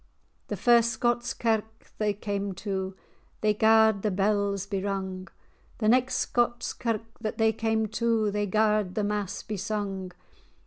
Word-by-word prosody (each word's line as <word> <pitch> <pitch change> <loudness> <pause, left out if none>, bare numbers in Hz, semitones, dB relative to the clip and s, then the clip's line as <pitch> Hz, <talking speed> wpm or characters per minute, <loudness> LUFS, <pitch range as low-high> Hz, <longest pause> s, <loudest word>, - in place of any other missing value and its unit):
The - - -3
first 235 -1 +5
Scots 240 +1 0
kirk 225 -2 +1 0.2
that - - -26
they 210 -1 +1
cam 200 -1 -3
to, 190 -1 -3 0.5
They 215 0 +3
garred 220 -1 +4
the 215 - +1
bells 200 0 0
be 200 -1 -3
rung; 190 -1 -3 0.5
The 215 - 0
next 255 +2 +3
Scots 240 0 0
kirk 225 -1 -4
that 220 -2 -4
they 220 0 +3
cam 220 0 0
to, 225 -1 +1
They 205 0 -1
garred 210 -2 +1
fhe 210 - 0
mass 205 -2 -2
be 215 - -4
sung. 195 -2 -3
210 Hz, 155 wpm, -27 LUFS, 200-225 Hz, 0.5 s, first